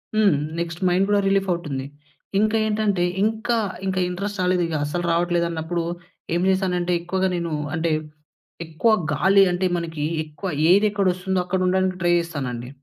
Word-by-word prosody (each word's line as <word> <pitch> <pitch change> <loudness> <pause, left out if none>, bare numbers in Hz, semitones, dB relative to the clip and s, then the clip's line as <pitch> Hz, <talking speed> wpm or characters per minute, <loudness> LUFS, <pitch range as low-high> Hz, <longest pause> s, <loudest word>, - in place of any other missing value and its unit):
హ్మ్. 210 -5 +4 0.3
Next 170 +1 -4
mind 180 +2 +3
కుడా 205 0 +3
relief 195 0 +2
అవుతుంది. 150 -6 -3 0.5
ఇంకా 215 +1 +2
ఏంటంటే, 210 -4 +1 0.2
ఇంకా, 225 +2 0 0.3
ఇంకా 190 -1 0
ఇంట్రెస్ట్ 200 +3 -4
రాలేదు 180 -1 +2
ఇగా, 160 - -2
అసలు 175 +4 -3
రావట్లేదు 175 0 +1
అన్నప్పుడు 165 +1 -2 0.5
ఏం 175 - +1
చేశానంటే, 180 -2 +1
ఎక్కువగా 190 +2 0
నేను 170 -1 -3 0.2
అంటే, 160 +1 0 0.8
ఎక్కువ 160 +8 +1 0.2
గాలి 195 +7 +4
అంటే 180 +1 0
మనకి 165 -3 -4 0.2
ఎక్కువ 155 +5 -7 0.2
ఏది 200 +3 +5
ఎక్కడ 200 -2 0
వస్తుందో, 185 +1 -2
అక్కడ 185 +1 -1
ఉండడానికి 185 0 +1
ట్రై 175 0 +3
చేస్తాను 145 -6 -4
అండి. 120 +1 -6
180 Hz, 160 wpm, -23 LUFS, 170-195 Hz, 0.8 s, ఏది